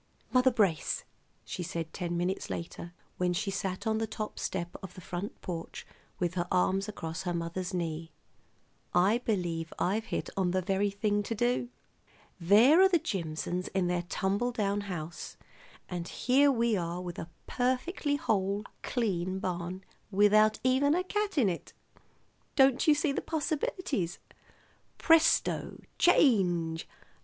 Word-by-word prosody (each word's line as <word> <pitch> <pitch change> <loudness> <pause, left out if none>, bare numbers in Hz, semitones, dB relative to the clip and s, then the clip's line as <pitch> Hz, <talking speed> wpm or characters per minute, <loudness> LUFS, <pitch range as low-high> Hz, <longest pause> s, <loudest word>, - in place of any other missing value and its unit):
"Mother 255 0 +5
Brace," 200 -10 +1 0.4
she - - -5
said 165 -2 -4
ten 175 -2 -3
minutes 180 +2 -2
later, 170 0 -6 0.3
when 180 -1 +1
she 195 +3 -1
sat 190 -1 -3
on 220 0 +1
the 225 - -1
top 215 0 -5
step 175 -1 -3
of 190 -2 -9
the - - -9
front 180 +3 -6
porch 165 -2 -6 0.3
with 175 -1 -1
her 175 -1 -1
arms 195 +3 +2
across 165 -3 -5
her 175 -2 -2
mother's 170 +3 -3
knee. 165 -2 -3 0.8
"I 195 +6 +4
believe 175 -8 -2
I've 210 +5 0
hit - - -3
on 190 -2 +1
the 185 +1 +1
very 195 +2 +1
thing 205 +1 0
to 225 +3 -3
do. 240 +2 0 0.7
There 220 - +6
are 385 - +7
the 355 - +4
Jimsons 180 - -3
in 190 -2 +2
their 175 0 0
tumble 200 +8 0
down 205 -3 0
house, 170 -5 -6 0.5
and 175 -1 -4
here 270 +8 +3
are - - +5
we 230 -5 +2 0.3
with 175 -1 -6
a 165 - -6 0.2
perfectly 260 +4 0
whole, 200 -5 0 0.2
clean 190 -6 -1
barn 180 0 -4 0.3
without 210 +2 +5
even 265 +4 +3
a 365 - +1
cat 410 -1 -2
in 245 -7 +4
it. 175 -3 -4 0.8
Don't 265 0 +4
you 305 - +7
see 300 -1 +1
the - - -2
possibilities? 300 - -2 0.8
Presto! 325 -1 +3 0.2
Change! 175 - +3
195 Hz, 150 wpm, -30 LUFS, 175-245 Hz, 0.8 s, are